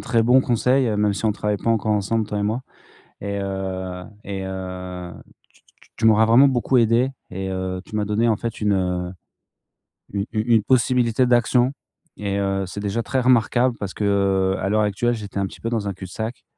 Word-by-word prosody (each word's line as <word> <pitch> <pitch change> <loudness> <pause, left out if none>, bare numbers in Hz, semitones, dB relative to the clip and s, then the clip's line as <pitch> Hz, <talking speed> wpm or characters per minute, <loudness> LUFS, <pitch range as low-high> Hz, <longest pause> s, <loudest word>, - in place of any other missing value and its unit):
très 115 -2 +1
bon 125 +3 +5
conseil, 125 +1 +2
heu, 105 -2 0
même 105 -1 +2
si 100 - -5
on 110 - +3
travaille 105 0 -1
pas 115 - -1
encore 110 -1 +1
ensemble 105 +2 0
toi 105 - -3
et - - -1
moi. 110 +4 -1 0.6
Et 100 0 -3
heu, 95 -2 -4 0.2
et 95 -1 -5
heu, 90 -2 -6 0.4
tu - - -26
tu - - -31
tu - - -22
tu 115 - +1
m'auras 110 0 +6
vraiment 125 +5 +6
beaucoup 130 0 +2
aidé 120 +3 +3 0.2
et 95 +1 -4
heu, 95 0 -3
tu - - -13
m'as 105 - 0
donné 105 +3 +1
en 110 - +3
fait 115 0 -5
une 90 -3 0 1.0
u 100 -1 -1
u 110 - 0
une 110 - +3
possibilité 125 0 +2
d'action. 125 +2 +3 0.4
Et 100 -1 -2
heu, 95 -1 0
c'est 95 +3 -7
déjà 105 +3 -2
très 130 - -1
remarquable 125 0 +3
parce 100 -2 -5
que, - - -4
heu, 95 -1 +2
à - - -1
l'heure 110 +1 +2
actuelle, 105 +4 +1
j'étais 105 -3 -6
un 100 - +1
petit - - -13
peu 115 - -2
dans 110 -4 -2
un 100 - -2
cul-de-sac 105 +6 -6
105 Hz, 210 wpm, -22 LUFS, 95-115 Hz, 1.0 s, m'auras